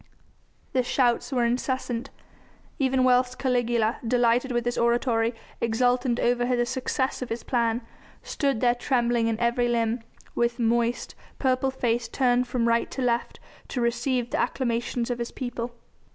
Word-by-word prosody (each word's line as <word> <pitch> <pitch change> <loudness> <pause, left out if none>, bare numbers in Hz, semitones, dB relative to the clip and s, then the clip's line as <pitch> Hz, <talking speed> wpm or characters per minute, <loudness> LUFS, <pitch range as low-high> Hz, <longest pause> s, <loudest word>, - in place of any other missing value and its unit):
The 255 - +3
shouts 245 0 +1
were 245 -3 +2
incessant, 245 0 -1 0.7
even 265 -1 +2
whilst 250 0 +3
Caligula, 240 -4 +1
delighted 245 +2 +2
with 240 -1 0
his 240 - 0
oratory, 235 -1 +1 0.3
exultant 245 +1 +1
over 245 0 +2
the 240 0 +1
success 260 +1 -2
of 255 - -4
his 230 +1 -4
plan, 235 -1 0 0.4
stood 275 -6 -1
there 240 -1 +4
trembling 240 -2 +1
in 225 -1 -1
every 240 +1 +2
limb, 230 0 +1 0.3
with 235 0 0
moist, 235 0 0 0.2
purple 260 0 +1
face 240 -3 -1
turned 250 0 +2
from 240 -1 0
right 230 0 +2
to 265 - -4
left 240 -1 -1 0.3
to 255 - -4
receive 240 +1 0
the - - 0
acclamations 240 -1 -1
of 240 - -3
his 235 - -3
people. 245 -2 -5
240 Hz, 150 wpm, -26 LUFS, 235-255 Hz, 0.7 s, there